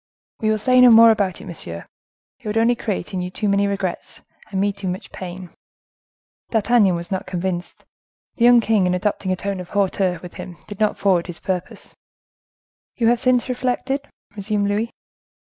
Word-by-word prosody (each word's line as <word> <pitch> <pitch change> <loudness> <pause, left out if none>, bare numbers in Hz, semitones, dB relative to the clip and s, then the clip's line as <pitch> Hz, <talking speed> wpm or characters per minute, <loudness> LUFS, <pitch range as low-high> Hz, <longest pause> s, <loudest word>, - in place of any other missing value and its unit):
"We 215 - 0
will 215 - +2
say 255 +4 +4
no 250 - +9
more 230 0 +8
about 200 -4 -1
it, - - -10
monsieur; 85 - -7 0.5
it - - -10
would 210 +1 -1
only 230 +2 +4
create 205 -5 -4
in 185 - -2
you 180 - -4
too 210 +3 -3
many 200 0 +2
regrets, 195 -3 -4 0.3
and 195 - -2
me 200 +1 +1
too 200 -1 -6
much 185 +2 -5
pain." 180 -1 -8 1.0
D'Artagnan 220 -4 +3
was 170 +2 -6
not 190 - -3
convinced. 180 -1 -4 0.5
The 235 - +3
young 240 -1 +7
king, 215 -4 +2
in 180 - +1
adopting 190 0 -1
a - - +1
tone 200 +1 -4
of 180 - -8
hauteur 190 -2 0
with 180 - -9
him, 175 -2 -9
did 205 - -9
not 215 -1 +1
forward 185 -4 +2
his 175 -2 -6
purpose. 185 -1 -5 1.0
"You 230 -2 +2
have 240 0 +2
since 255 -1 +2
reflected?" 260 +2 -2 0.3
resumed 205 0 -1
Louis. 215 +3 -1
200 Hz, 185 wpm, -21 LUFS, 185-225 Hz, 1.0 s, no